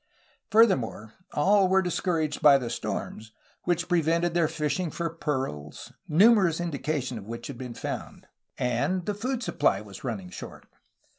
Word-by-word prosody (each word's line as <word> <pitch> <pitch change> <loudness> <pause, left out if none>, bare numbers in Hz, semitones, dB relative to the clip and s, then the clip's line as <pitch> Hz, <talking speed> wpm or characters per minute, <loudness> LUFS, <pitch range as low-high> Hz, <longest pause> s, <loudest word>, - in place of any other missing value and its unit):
Further 220 -2 +6
more, 110 -3 -6 0.2
all 195 +5 +4
were 190 +1 +3
discouraged 165 -4 -1
by 145 -3 +8
the 125 -3 -4
storms, 110 0 -5 0.3
which 175 0 0
prevented 170 0 +2
their 170 -2 +3
fishing 160 +2 -1
for 165 +2 -3
pearls, 130 - -4
numerous 190 -1 +5
indications 145 -6 -2
of 100 - -12
which 115 +1 -6
had 140 - -7
been 125 -2 -6
found, - - -6 0.3
and 125 +10 0
the 210 - -1
food 245 +4 -3
supply - - +1
was 100 -2 -11
running 100 -8 -4
short. - - -9
155 Hz, 150 wpm, -27 LUFS, 125-180 Hz, 0.3 s, by